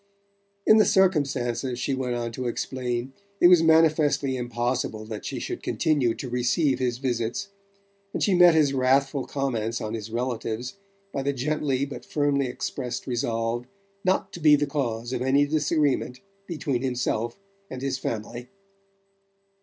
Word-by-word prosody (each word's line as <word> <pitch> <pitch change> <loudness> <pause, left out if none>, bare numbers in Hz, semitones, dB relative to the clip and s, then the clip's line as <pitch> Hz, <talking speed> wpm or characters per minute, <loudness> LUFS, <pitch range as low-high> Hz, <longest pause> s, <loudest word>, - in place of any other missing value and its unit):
In 215 - +7
the 215 - +6
circumstances, 135 -9 +1
she 135 - -1
went 130 -2 -2
on 120 -1 -3
to 125 +2 -4
explain, 125 +1 -3 0.3
it 175 - +7
was 180 -2 +7
manifestly 155 -4 +3
impossible 120 -2 -2
that 110 -1 -7
she - - -4
should - - -5
continue 140 -8 +1
to 135 - -6
receive 125 +3 +1
his 125 -2 0
visits; 125 - -2 0.6
and - - -2
she 200 - +3
met 175 -2 +7
his 145 -3 +3
wrathful 135 +1 +2
comments 120 -5 -2
on 110 0 -4
his 110 -1 -5
relatives 120 - -3 0.4
by 135 - -1
the 140 +1 0
gently 140 0 -1
but 140 - -8
firmly 145 -2 0
expressed 125 0 -4
resolve 120 -1 -2 0.4
not 185 +1 0
to - - -7
be 150 -2 +6
the 145 0 +1
cause 120 -4 -3
of - - -2
any 135 +3 +3
disagreement 145 -4 0 0.3
between 140 -7 -2
himself 120 -3 -1 0.3
and 130 0 -7
his 135 - -1
family. 120 +2 -5
130 Hz, 150 wpm, -25 LUFS, 120-145 Hz, 0.6 s, In